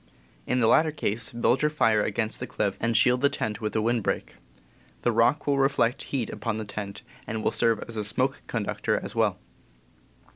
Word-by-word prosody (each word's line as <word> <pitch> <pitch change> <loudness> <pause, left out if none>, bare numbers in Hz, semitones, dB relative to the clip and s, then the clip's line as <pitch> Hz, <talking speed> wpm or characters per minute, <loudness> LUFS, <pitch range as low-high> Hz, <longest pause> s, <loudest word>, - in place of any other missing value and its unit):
In 125 - +1
the 115 - +4
latter 155 +7 +5
case, 115 -7 -2
build 120 +2 +1
your 150 - +3
fire 115 -8 +2
against 110 +1 -2
the - - -4
cliff, 100 -2 -1
and 115 0 +2
shield 125 0 +4
the 140 - +4
tent 110 -5 -3
with 105 -1 -3
a 110 - +1
wind 120 +1 +1
break. - - -2 0.7
The 120 - +3
rock 120 +6 +2
will 140 -1 +1
reflect 135 -3 +2
heat 125 -6 -1
upon 110 +1 -3
the 110 - -4
tent, 100 -1 -6 0.2
and 110 0 -3
will - - +2
serve 115 -2 +2
as 115 -1 -7
a 105 - -1
smoke 105 - 0
conductor - - -1
as - - -7
well. - - +1
115 Hz, 205 wpm, -26 LUFS, 110-125 Hz, 0.7 s, latter